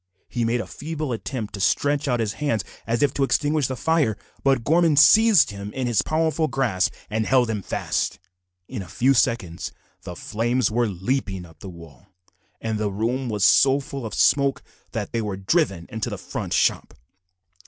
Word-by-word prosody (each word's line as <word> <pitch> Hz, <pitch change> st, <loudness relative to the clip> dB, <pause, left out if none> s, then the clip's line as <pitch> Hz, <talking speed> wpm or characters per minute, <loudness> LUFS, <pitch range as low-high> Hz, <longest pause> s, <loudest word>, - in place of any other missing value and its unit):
He 120 Hz, -, -2 dB
made 120 Hz, +2 st, +1 dB
a -, -, -6 dB
feeble 150 Hz, -, -5 dB
effort 115 Hz, -1 st, -5 dB
to 100 Hz, -, -6 dB
stretch 145 Hz, +8 st, +1 dB
out 125 Hz, -3 st, +1 dB
his 110 Hz, -2 st, -1 dB
hands 115 Hz, -9 st, 0 dB, 0.2 s
as 115 Hz, +4 st, +1 dB
if 140 Hz, -2 st, +2 dB
to 140 Hz, -, 0 dB
extinguish 145 Hz, +1 st, +1 dB
the 130 Hz, -, -3 dB
fire, 145 Hz, -6 st, +1 dB, 0.3 s
but 135 Hz, -4 st, +2 dB
Gorman 160 Hz, +1 st, +3 dB
seized 215 Hz, -, +6 dB
him 100 Hz, 0 st, -7 dB
in 130 Hz, -1 st, -2 dB
his 120 Hz, -4 st, +2 dB
powerful 160 Hz, 0 st, 0 dB
grasp 115 Hz, -11 st, 0 dB, 0.2 s
and 110 Hz, 0 st, -1 dB
held 125 Hz, -3 st, +3 dB
him 105 Hz, -2 st, -3 dB
fast. -, -, -2 dB, 0.5 s
In 125 Hz, -6 st, -5 dB
a 95 Hz, -, -9 dB
few 130 Hz, +9 st, +2 dB
seconds 115 Hz, -9 st, 0 dB, 0.3 s
the -, -, -8 dB
flames 120 Hz, +2 st, -1 dB
were 120 Hz, +1 st, +1 dB
leaping 95 Hz, -1 st, -2 dB
up 80 Hz, -2 st, -18 dB
the 95 Hz, -, -8 dB
walls, 85 Hz, -5 st, -14 dB, 0.5 s
and 110 Hz, -1 st, -3 dB
the 105 Hz, -1 st, -1 dB
room 120 Hz, +6 st, -2 dB
was 105 Hz, -2 st, +1 dB
so 135 Hz, +4 st, +5 dB
full 135 Hz, -1 st, -7 dB
of 110 Hz, -3 st, -5 dB
smoke 140 Hz, -1 st, +3 dB, 0.3 s
that -, -, -4 dB
they 115 Hz, -, -1 dB
were 105 Hz, -3 st, -3 dB
driven 95 Hz, -, 0 dB
into 110 Hz, -2 st, -3 dB
the -, -, -5 dB
front -, -, -5 dB
shop. -, -, +1 dB
120 Hz, 185 wpm, -23 LUFS, 105-140 Hz, 0.5 s, seized